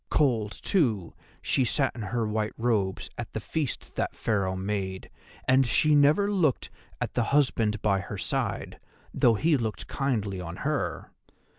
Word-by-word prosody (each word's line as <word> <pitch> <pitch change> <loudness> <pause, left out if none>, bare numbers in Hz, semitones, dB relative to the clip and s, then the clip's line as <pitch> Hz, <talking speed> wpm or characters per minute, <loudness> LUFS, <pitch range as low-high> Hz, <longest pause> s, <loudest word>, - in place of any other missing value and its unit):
"Cold, 115 -8 +2
too, 115 - 0 0.3
she 130 - +2
sat 135 +2 +1
in 120 - -7
her 115 +2 -1
white 110 0 -1
robes 105 -5 0
at - - -6
the - - -2
feast 150 -6 -3
that - - -1
Pharaoh 100 -4 0
made, 95 -1 -3 0.4
and 130 +1 +5
she 150 +5 +3
never 150 +7 +5
looked 165 -10 +1 0.3
at - - -3
the 120 - +1
husband 115 -6 +2
by 100 -2 +3
her - - -6
side, - - -2 0.3
though 115 -2 +4
he 155 +7 +3
looked 110 -3 -3
kindly 105 -9 -2
on 85 -1 -6
her. - - -2
115 Hz, 155 wpm, -27 LUFS, 100-140 Hz, 0.4 s, and